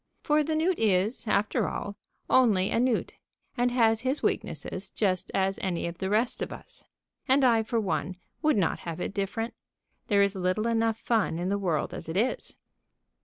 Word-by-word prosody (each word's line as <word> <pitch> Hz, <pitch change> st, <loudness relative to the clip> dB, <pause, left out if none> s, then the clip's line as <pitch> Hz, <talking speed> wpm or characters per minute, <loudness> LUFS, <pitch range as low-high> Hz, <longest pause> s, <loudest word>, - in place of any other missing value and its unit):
For 300 Hz, 0 st, +3 dB
the 310 Hz, +1 st, -1 dB
newt 335 Hz, +3 st, +1 dB
is, 215 Hz, +2 st, +1 dB
after 210 Hz, 0 st, +1 dB
all, 205 Hz, -, -5 dB, 0.3 s
only 210 Hz, -7 st, +4 dB
a -, -, +2 dB
newt, 250 Hz, -1 st, 0 dB, 0.4 s
and 245 Hz, 0 st, +2 dB
has 225 Hz, -2 st, +3 dB
his 265 Hz, +4 st, -1 dB
weaknesses -, -, -2 dB
just 185 Hz, -4 st, -1 dB
as 195 Hz, 0 st, +1 dB
any 180 Hz, -3 st, -1 dB
of 170 Hz, 0 st, -5 dB
the 190 Hz, -, -2 dB
rest 220 Hz, +4 st, +1 dB
of -, -, -3 dB
us. -, -, -11 dB, 0.4 s
And 265 Hz, +1 st, +4 dB
I, 235 Hz, -3 st, +5 dB
for 230 Hz, +1 st, -1 dB
one, 190 Hz, -2 st, -2 dB, 0.3 s
would 305 Hz, -6 st, +3 dB
not 185 Hz, -5 st, +1 dB
have 170 Hz, -1 st, -6 dB
it 185 Hz, -, -3 dB
different. 225 Hz, +4 st, -2 dB, 0.5 s
There 200 Hz, -2 st, +4 dB
is 200 Hz, -1 st, +1 dB
little 185 Hz, +3 st, 0 dB
enough 225 Hz, -1 st, +1 dB
fun 220 Hz, -9 st, 0 dB
in 175 Hz, +2 st, -2 dB
the 200 Hz, +1 st, 0 dB
world 175 Hz, -6 st, -1 dB
as -, -, -7 dB
it 165 Hz, -, -2 dB
is. 235 Hz, +5 st, -1 dB
215 Hz, 185 wpm, -28 LUFS, 190-240 Hz, 0.5 s, I